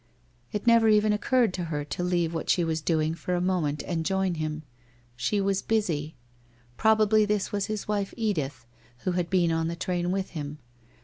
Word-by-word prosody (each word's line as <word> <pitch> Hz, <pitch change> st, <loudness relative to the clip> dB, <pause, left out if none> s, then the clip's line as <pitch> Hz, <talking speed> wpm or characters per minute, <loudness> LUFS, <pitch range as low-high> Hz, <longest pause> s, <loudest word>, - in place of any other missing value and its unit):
It 210 Hz, +1 st, -3 dB
never 230 Hz, -1 st, +6 dB
even 210 Hz, 0 st, +4 dB
occurred 235 Hz, 0 st, +2 dB
to 180 Hz, -2 st, -3 dB
her 150 Hz, -3 st, -3 dB
to 180 Hz, -, -4 dB
leave 175 Hz, -2 st, 0 dB
what 165 Hz, -, -4 dB
she 175 Hz, -, +3 dB
was 160 Hz, -1 st, -1 dB
doing 155 Hz, 0 st, +1 dB
for 175 Hz, +2 st, -3 dB
a -, -, +1 dB
moment 175 Hz, -6 st, 0 dB
and 165 Hz, -2 st, -2 dB
join 190 Hz, +1 st, 0 dB
him. 155 Hz, -1 st, -3 dB, 0.5 s
She 125 Hz, -, 0 dB
was 195 Hz, 0 st, +1 dB
busy. 165 Hz, -9 st, -1 dB, 0.6 s
Prob 220 Hz, -, +4 dB
ably 215 Hz, 0 st, +4 dB
this 210 Hz, -1 st, 0 dB
was 200 Hz, -1 st, -1 dB
his 215 Hz, -1 st, -4 dB
wife 205 Hz, -2 st, -1 dB
Edith, 150 Hz, -, -2 dB, 0.4 s
who 185 Hz, -, 0 dB
had 175 Hz, -1 st, -1 dB
been 175 Hz, -3 st, +2 dB
on 165 Hz, 0 st, 0 dB
the 170 Hz, -, -3 dB
train 175 Hz, 0 st, -2 dB
with 190 Hz, +1 st, -2 dB
him. 150 Hz, -2 st, -5 dB
180 Hz, 195 wpm, -27 LUFS, 160-210 Hz, 0.6 s, never